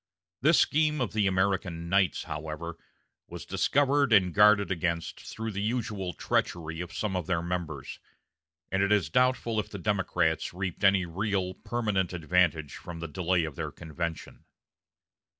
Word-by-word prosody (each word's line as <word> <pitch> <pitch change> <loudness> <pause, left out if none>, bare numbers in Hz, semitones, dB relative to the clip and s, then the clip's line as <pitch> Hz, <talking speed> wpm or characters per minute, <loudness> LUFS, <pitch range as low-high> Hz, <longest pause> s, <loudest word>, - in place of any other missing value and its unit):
This 155 +6 +5
scheme 150 0 +3
of 125 -5 -1
the 105 -2 +2
American 95 -3 0
Knights, 95 0 +2
however, 80 +2 -5 0.5
was - - -8
discovered 140 -2 +2
and 95 -5 +5
guarded 105 -1 +5
against 85 -1 -2
through 110 0 -6
the 100 0 -3
usual 105 -5 -2
treachery 80 +1 -1
of 90 -1 -6
some 100 +1 -2
of 90 -3 -2
their 85 -2 0
members; 85 -6 -4 0.7
and 95 - +1
it 100 +1 +2
is 105 -4 +2
doubtful 125 -3 +2
if - - -3
the 100 - -6
Democrats 90 -4 0
reaped 95 +1 -4
any 95 -2 +5
real, 95 +1 -1
permanent 105 -5 -1
advantage 85 -3 +1
from 85 -1 -8
the 85 - -4
delay 90 +2 0
of 80 -3 -5
their - - -4
convention. 85 0 -6
95 Hz, 150 wpm, -28 LUFS, 85-105 Hz, 0.7 s, This